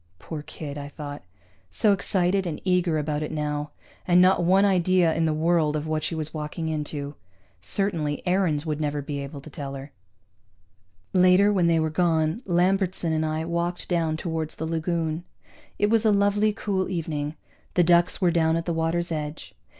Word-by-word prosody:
Poor 155 - -7
kid, 145 -1 -7
I 140 0 -7
thought. 145 -1 -7 0.5
So 205 - +3
excited 190 -1 +1
and 160 - -4
eager 180 -3 +2
about 150 0 -2
it 150 - -3
now. 150 -1 -2 0.4
And 175 0 +5
not 180 -1 +5
one 190 +3 +4
idea 185 -3 +3
in 165 - +1
the 160 - +2
world 160 -1 +2
of 150 0 -2
what 155 -1 -2
she 165 - -2
was 155 -1 -3
walking 155 +1 -4
into. 150 -2 -4 0.5
Certainly 155 - -1
Aarons 180 -5 +1
would 155 -1 -2
never 145 -1 -1
be 140 0 -4
able 140 0 -7
to 155 - -11
tell 140 -1 -6
her. 135 +1 -9 1.2
Later, 185 +3 +5
when 180 -4 +3
they 165 -1 +3
were 160 0 0
gone, 160 +2 +1
Lambertson 180 -1 +1
and 155 0 +1
I 155 +1 -2
walked 170 +1 -2
down 165 -3 0
toward 160 -1 -3
the 160 - -5
lagoon. 165 0 -2 0.5
It 205 +1 +2
was 225 -1 +3
a 220 - +4
lovely 205 +1 +3
cool 200 -3 -2
evening; 155 -4 -3 0.4
the 175 - +5
ducks 175 +1 +3
were 180 -3 +3
down 165 -1 +2
at 165 0 -2
the 170 - -1
water's 165 +1 -1
edge. 150 -1 -5
165 Hz, 180 wpm, -25 LUFS, 155-180 Hz, 1.2 s, And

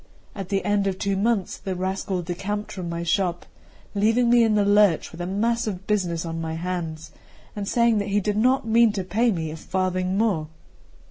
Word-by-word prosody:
At 195 -3 -6
the 195 -1 -1
end 205 -1 +1
of 190 -1 -1
two 200 0 -1
months 205 -1 0
the 190 -1 -4
rascal 185 0 -2
decamped 195 +4 -4
from 180 -3 -5
my 170 0 -3
shop, 175 0 0 0.5
leaving 225 +4 +3
me 240 -1 +6
in 220 -2 +3
the 205 -1 +3
lurch 205 -4 +3
with 170 - -8
a 175 - -3
mass 230 +5 0
of 195 -2 -4
business 175 -6 -1
on 165 0 -4
my 160 0 -3
hands, 165 -2 -4 0.4
and 205 -1 -4
saying 235 -1 +3
that 200 - -2
he 205 +1 +2
did 205 +1 -1
not 255 +3 +3
mean 230 0 +5
to 195 -3 -2
pay 225 +6 +1
me 160 -5 -3
a - - -6
farthing 185 +2 -1
more. 195 -8 +1
195 Hz, 205 wpm, -24 LUFS, 175-210 Hz, 0.5 s, me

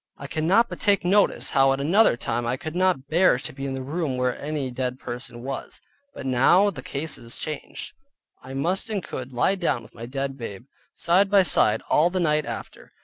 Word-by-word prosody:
I - - -9
cannot 180 +9 +2
but - - -8
take 200 -3 +2
notice 200 +3 +2
how 135 0 +4
at 135 - -3
another 170 - +4
time 120 0 -2
I 125 +2 -1
could 160 +1 -7
not 180 -7 +1
bear 170 -2 +4
to 125 - -4
be 135 +1 -5
in 135 - -3
the 130 - -5
room 145 -1 -2
where 125 -1 0
any 145 -3 -3
dead 125 0 -3
person 120 -1 -7
was, 135 +1 -6 0.4
but - - -7
now 135 +11 +4
the 135 - -8
case 140 +3 -4
is 115 0 -2
changed; 155 -2 -5 0.5
I 130 +1 -9
must 175 +10 -1
and 205 -4 -2
could 130 0 -6
lie 125 +9 +2
down 170 -10 -1
by - - -14
my 115 - -8
dead 135 +1 -4
babe, 115 0 -7 0.3
side 185 +4 +3
by 200 -1 +5
side 110 -9 +2
all 160 +3 +4
the 185 +1 -2
night 150 -3 +1
after. - - -8
140 Hz, 210 wpm, -24 LUFS, 130-175 Hz, 0.5 s, by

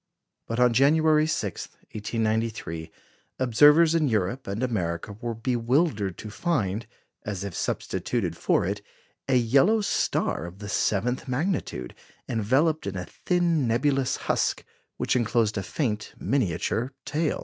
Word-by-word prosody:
" - - -57
But 115 +1 -2
on 125 -1 +5
January 155 +4 +4
16, 105 - -3 0.2
1893, 110 -6 -2 0.5
observers 150 +6 +6
in 160 -3 +2
Europe 110 +2 -1
and 100 +5 -3
America 95 -5 -2
were 120 -1 -3
bewildered 115 - 0
to 105 - -8
find, 115 - -1 0.4
as 100 -2 -4
if 100 -3 -5
substituted - - -2
for - - +1
it, 100 +2 -2 0.5
a 135 - +2
yellow 135 - +4
star 145 - 0
of 85 +2 -11
the 100 0 -8
seventh 115 +7 0
magnitude, 130 - -2 0.3
enveloped 135 +7 +1
in 100 -1 -3
a 90 - -4
thin 170 - 0
nebulous 130 +3 +1
husk, - - 0 0.3
which - - 0
enclosed 115 -2 +1
a 100 - -1
faint 105 - -3
miniature 115 - 0
tail. 150 +2 -1
120 Hz, 135 wpm, -26 LUFS, 105-145 Hz, 0.5 s, observers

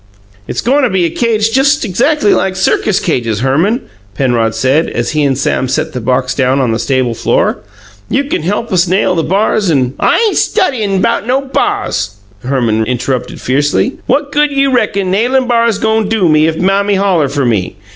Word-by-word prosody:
"It's - - -3
goin' 275 +4 +2
to 255 - +2
be 185 -3 +1
a 165 - -1
cage 225 +1 0
just 275 +3 +2
exactly 230 - +1
like 190 -1 0
circus 190 +1 +1
cages, 115 - -1
Herman," 165 - +1 0.3
Penrod 115 -3 0
said, 130 +7 +1
as 120 0 -2
he 155 - 0
and 135 -2 +1
Sam 135 -1 -1
set 130 - -2
the 125 - -4
box 125 +2 0
down 130 0 +1
on 125 -4 +1
the 110 - -1
stable 130 -3 0
floor. - - 0 0.5
"You 275 - +1
can 280 - -3
help 205 +7 -2
us 180 0 +2
nail 185 +1 +1
the 165 - 0
bars 200 +3 0
and 130 -5 +1
" - - -26
"I - - +2
ain' 420 - -1
studyin' 220 - 0
'bout 235 -1 0
no 260 +2 +1
bars!" 275 - -2 0.3
Herman 120 -4 0
interrupted 125 +1 -3
fiercely. 145 - 0
"What 285 0 0
good 295 +1 +2
you 275 -1 +1
reckon 200 -6 0
nailin' 250 +6 +1
bars 235 -3 +2
go' 220 +1 +1
do 210 -3 0
me 155 0 +3
if 160 0 -2
Mammy 200 +3 +1
holler 185 -7 +1
fer 140 -1 -1
me? 105 -6 -1
185 Hz, 195 wpm, -12 LUFS, -, 0.5 s, me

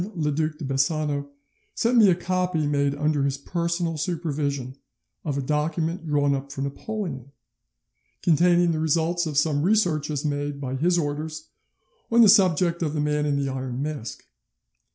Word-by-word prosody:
le 150 -3 0
Duc 155 +1 -1
de 155 - -6
Bassano 140 +1 0 0.5
sent 235 +2 +1
me 220 -4 +7
a 180 - +4
copy 180 -3 -1
made 140 -1 +1
under 150 0 0
his 140 0 0
personal 170 +2 -2
supervision 145 -5 -2 0.5
of 145 -3 -2
a 140 - -2
document 160 +4 -1
drawn 145 -1 +2
up 140 0 -4
for 135 0 -4
Napoleon, 140 - -5 0.9
containing 175 +1 +4
the 160 - -1
results 165 +2 +1
of 150 -3 -3
some 145 -1 +2
researches 155 -7 +1
made 145 -1 -2
by 130 -2 -4
his 175 +6 +2
orders 155 0 -3 0.6
on 235 +1 +6
the 220 - +8
subject 180 -4 +4
of 155 -2 -1
the - - -1
Man 150 0 0
in 145 - +1
the 140 -1 -1
Iron 130 -1 -4
Mask. 145 -6 -5
150 Hz, 160 wpm, -24 LUFS, 140-170 Hz, 0.9 s, the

